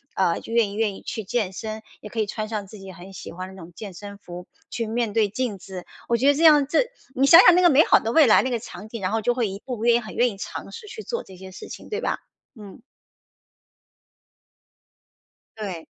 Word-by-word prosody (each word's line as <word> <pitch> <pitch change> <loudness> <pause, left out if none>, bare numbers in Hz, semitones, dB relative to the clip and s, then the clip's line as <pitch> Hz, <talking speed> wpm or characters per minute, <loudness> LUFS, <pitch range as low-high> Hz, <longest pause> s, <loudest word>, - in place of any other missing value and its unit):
呃， 180 -3 +1
就 - - -11
愿 230 -3 +3
意 - - -8
愿 210 -2 0
意 - - -12
去 220 - -5
健 200 -1 -2
身， 220 +2 -6 0.2
也 210 - -9
可 225 - -5
以 215 - +2
穿 215 +1 -4
上 210 -3 -3
自 210 - -12
己 195 0 -10
很 185 +1 -12
喜 185 - -9
欢 185 +2 -7
的 - - -12
那 190 - -12
种 165 +1 -12
健 205 -1 -8
身 200 +2 -9
服 180 -2 -10 0.2
去 230 -1 -3
面 225 -1 -1
对 215 -2 +2
镜 220 -2 -3
子。 185 -1 -9 0.2
我 235 - +3
觉 260 +4 +2
得 285 - +6
这 300 +4 -1
样 300 -3 +7
这 330 - +2 0.3
你 270 +2 +3
想 330 +4 +10
想 365 - +8
那 360 - +4
个 350 - +6
美 295 0 +6
好 - - +5
的 225 - -3
未 315 +3 +6
来， 220 - +6
那 260 - -2
个 245 - 0
场 210 0 -10
景， 230 - -6
然 185 - -1
后 225 0 0
就 245 +3 +1
会 240 -3 0
一 195 0 -6
步 250 -2 -4
步 220 - -4
愿 235 -1 +5
意 - - +3
很 215 -2 -9
愿 245 +1 +3
意 200 - -11
尝 - - -7
试 460 -2 -10
去 435 +1 -8
做 470 - -4
这 190 - -14
些 190 +1 -11
事 185 - -10
情， - - -10
对 430 - -3
吧。 - - -1 0.4
嗯。 205 +2 -12 2.8
对。 185 -6 -5
220 Hz, 280 characters per minute, -24 LUFS, 195-245 Hz, 2.8 s, 想